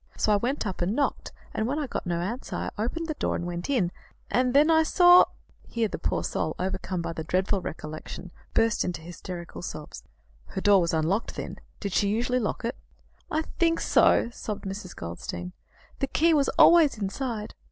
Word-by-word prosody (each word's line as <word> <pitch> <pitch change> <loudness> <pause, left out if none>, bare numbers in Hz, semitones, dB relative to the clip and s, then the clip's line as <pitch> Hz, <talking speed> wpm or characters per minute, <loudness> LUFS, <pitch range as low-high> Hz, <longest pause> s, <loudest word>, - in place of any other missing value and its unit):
So 215 - +3
I - - +5
went 245 +6 -1
up 190 -4 -4
and 185 +5 0
knocked, 280 - -1 0.2
and 220 - -1
when 280 +4 -1
I 305 - -1
got 250 - -5
no 170 -1 0
answer, 230 +9 -4
I - - -2
opened 330 +9 -2
the 320 - -2
door - - -1
and 175 - -3
went 175 +3 -4
in, 215 -11 +2 0.4
and 250 0 +2
then 300 +3 +6
I 320 0 +6
saw 355 +2 +7 0.2
" - - -30
Here 230 -1 +2
the - - -6
poor - - -1
soul, - - -2
overcome 185 -1 -2
by 170 0 -3
the 160 - -5
dreadful 185 +4 0
recollection, 155 +3 -7 0.2
burst 225 -1 +3
into 180 -3 -3
hysterical 175 +1 -8
sobs. 155 -3 -7 0.5
"Her 190 - -5
door 200 -1 +5
was 170 - 0
unlocked, 170 +8 0
then; - - -6 0.2
did 200 -3 -4
she 200 - +3
usually 240 +4 +1
lock 230 +1 -2
it?" 235 - -2 0.5
"I 315 +1 0 0.2
think 330 -1 +3
so," 235 - +4
sobbed 210 -4 -6
Mrs. 195 -1 -6
Goldstein. 85 +1 -6 0.5
"The 275 - 0
key 330 +4 +3
was 285 -2 +3
always 330 -7 +7
inside." 215 +2 -3
210 Hz, 195 wpm, -27 LUFS, 175-270 Hz, 0.5 s, saw